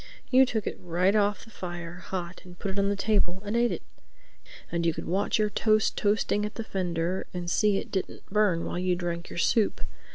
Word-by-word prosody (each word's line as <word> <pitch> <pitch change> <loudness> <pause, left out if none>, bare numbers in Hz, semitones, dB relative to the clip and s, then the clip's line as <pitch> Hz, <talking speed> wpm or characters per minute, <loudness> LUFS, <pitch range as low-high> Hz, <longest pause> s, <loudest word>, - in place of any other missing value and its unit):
You 260 0 +7
took 220 -4 -1
it - - -4
right 180 +3 +1
off 205 +1 +2
the 225 - -16
fire, 175 -3 -6
hot, 180 -1 -5
and 180 -1 -13
put 195 - -3
it 195 - -2
on 200 0 +2
the 200 - +1
table 200 -3 +1
and 205 +3 -2
ate 235 0 +3
it. - - -4 0.9
And 170 0 0
you 165 -1 +2
could - - -5
watch 195 +6 +1
your 210 -1 +1
toast 215 0 +2
toasting 210 0 +1
at 210 - -4
the 225 - -3
fender 180 -2 -2
and 175 -1 -3
see 205 +3 +3
it - - -5
didn't 190 - -3
burn 200 -5 +2
while - - -3
you 180 0 +1
drank 170 -1 -3
your - - -8
soup. 210 +5 +2
190 Hz, 220 wpm, -28 LUFS, 175-210 Hz, 0.9 s, You